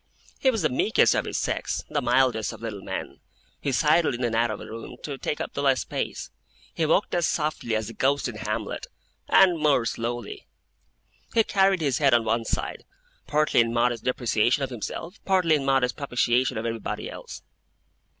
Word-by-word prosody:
He 265 Hz, -, +3 dB
was 225 Hz, -5 st, 0 dB
the -, -, +3 dB
meekest 125 Hz, -, +3 dB
of -, -, 0 dB
his -, -, -3 dB
sex, -, -, -2 dB
the -, -, -1 dB
mildest 125 Hz, -4 st, +2 dB
of -, -, -11 dB
little 105 Hz, -4 st, -5 dB
men. -, -, -6 dB, 0.4 s
He 140 Hz, -, -1 dB
sidled 150 Hz, +1 st, +3 dB
in 125 Hz, -, -4 dB
and 120 Hz, -1 st, 0 dB
out 115 Hz, +1 st, +2 dB
of 105 Hz, -, -4 dB
a -, -, -8 dB
room, 115 Hz, +1 st, -8 dB
to 145 Hz, -, -4 dB
take 150 Hz, -, -3 dB
up -, -, -4 dB
the 140 Hz, -, -2 dB
less 135 Hz, -2 st, +3 dB
space. -, -, -4 dB, 0.4 s
He 160 Hz, -, 0 dB
walked 185 Hz, +6 st, +2 dB
as 175 Hz, -2 st, +2 dB
softly 150 Hz, -7 st, -1 dB
as 110 Hz, 0 st, -1 dB
the 115 Hz, -, -7 dB
Ghost 140 Hz, +3 st, +1 dB
in 120 Hz, -3 st, -6 dB
Hamlet, 110 Hz, 0 st, -4 dB, 0.4 s
and 180 Hz, -4 st, +5 dB
more 145 Hz, -6 st, +3 dB
slowly. 115 Hz, -1 st, -4 dB, 0.9 s
He 225 Hz, -, +5 dB
carried 195 Hz, -3 st, +2 dB
his 140 Hz, -5 st, +1 dB
head 140 Hz, -4 st, +5 dB
on 115 Hz, -, +3 dB
one 115 Hz, +1 st, 0 dB
side, -, -, -3 dB, 0.4 s
partly 150 Hz, -2 st, +2 dB
in 115 Hz, 0 st, +3 dB
modest 120 Hz, -1 st, +1 dB
depreciation 120 Hz, +1 st, +1 dB
of 135 Hz, -, -3 dB
himself, 165 Hz, -, -6 dB
partly 185 Hz, -4 st, +3 dB
in 145 Hz, -3 st, +1 dB
modest 135 Hz, -2 st, +2 dB
propitiation 125 Hz, -2 st, +1 dB
of 110 Hz, -, -3 dB
everybody 115 Hz, -2 st, -3 dB
else. -, -, -9 dB
130 Hz, 190 wpm, -25 LUFS, 115-150 Hz, 0.9 s, and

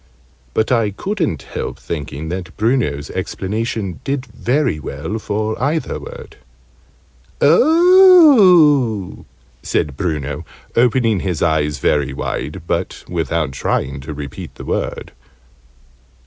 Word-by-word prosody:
But 110 Hz, -, +1 dB
I 115 Hz, -4 st, +2 dB
couldn't 165 Hz, -, -3 dB
help -, -, -5 dB
thinking 75 Hz, -1 st, -6 dB
that 90 Hz, 0 st, -6 dB
Bruno's 110 Hz, -, 0 dB
explanation 105 Hz, -, -3 dB
did 135 Hz, -1 st, -2 dB
very 125 Hz, -, -1 dB
well 105 Hz, +8 st, -5 dB
for 110 Hz, +2 st, -3 dB
either 150 Hz, +4 st, -1 dB
word. -, -, -11 dB, 1.0 s
"Oh!" 205 Hz, -, +5 dB, 0.4 s
said 75 Hz, -3 st, -1 dB
Bruno, 75 Hz, -4 st, -3 dB, 0.3 s
opening 115 Hz, -3 st, +2 dB
his 90 Hz, -3 st, -2 dB
eyes 75 Hz, -3 st, +1 dB
very 70 Hz, 0 st, 0 dB
wide, 75 Hz, +5 st, -4 dB
but 85 Hz, +2 st, -3 dB
without 80 Hz, -3 st, -1 dB
trying 65 Hz, +1 st, -2 dB
to 75 Hz, +4 st, -8 dB
repeat 70 Hz, -2 st, -8 dB
the -, -, -9 dB
word. -, -, -3 dB
105 Hz, 105 wpm, -18 LUFS, -, 1.0 s, Oh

